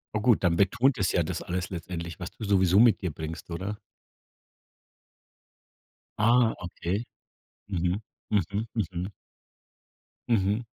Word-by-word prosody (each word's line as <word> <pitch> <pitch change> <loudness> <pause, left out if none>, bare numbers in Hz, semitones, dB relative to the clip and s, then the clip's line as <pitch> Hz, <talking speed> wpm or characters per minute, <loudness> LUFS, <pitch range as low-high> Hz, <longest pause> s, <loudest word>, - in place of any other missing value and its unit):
Oh 105 - +1
gut, 115 -4 +4
dann 85 -1 +3
betont 120 +8 +3
es 100 -3 +1
ja 90 - +2
das - - -3
alles 90 0 -3
letztendlich, 85 -2 -6
was 90 - -6
du 110 - -10
sowieso 95 -1 +4
mit 115 -3 +6
dir 90 - -1
bringst, 80 +2 -7
oder? 95 +5 -3 2.4
Ah, 115 +1 +4
okay. 90 +4 -3 0.7
Mhm, 90 +1 0 0.3
mhm, 105 +1 0
mhm. 90 -2 -2 1.2
Mhm. 105 0 +2
95 Hz, 125 wpm, -28 LUFS, 85-110 Hz, 2.4 s, mit